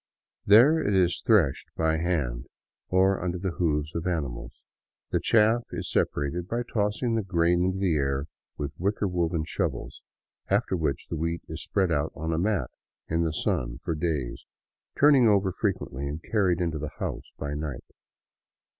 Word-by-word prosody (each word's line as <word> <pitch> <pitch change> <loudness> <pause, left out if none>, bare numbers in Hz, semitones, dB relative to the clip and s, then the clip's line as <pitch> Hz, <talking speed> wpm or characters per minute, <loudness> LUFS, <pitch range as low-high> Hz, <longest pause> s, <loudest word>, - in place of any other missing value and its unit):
There 125 +11 +7
it 105 -10 +1
is 90 -2 +2
threshed 95 - +3
by 80 0 +2
hand, 75 -8 -1 0.4
or 95 +1 +3
under 90 0 -1
the 95 +1 -2
hoofs 75 -3 -1
of 85 +2 -3
animals; 70 -9 -4 0.5
the - - +2
chaff 115 +1 +4
is 90 0 -4
separated 85 +5 -1
by 120 +3 -1
tossing 105 +1 -1
the 115 - +1
grain 85 -2 +2
into 95 +1 0
the 95 -3 +1
air 70 0 0 0.3
with 70 0 -4
wicker 100 +3 0
woven 85 -3 0
shovels, 75 -8 -3 0.5
after - - +1
which 75 -5 -2
the - - -3
wheat 85 +1 -2
is - - -6
spread 95 -3 0
out 75 -1 0
on 80 +2 -2
a 80 - 0
mat 95 -8 0 0.4
in 80 +1 +1
the 80 -1 +1
sun - - -1
for 85 - -1
days, 75 -6 -3 0.5
turned 140 -4 +6
over 100 -2 +3
frequently 90 - -2
and 75 +3 -5
carried 95 -5 +1
into 80 -3 -1
the 75 0 -5
house - - -4
by 70 0 -4
night. 75 -4 -5
85 Hz, 165 wpm, -27 LUFS, 75-95 Hz, 0.5 s, There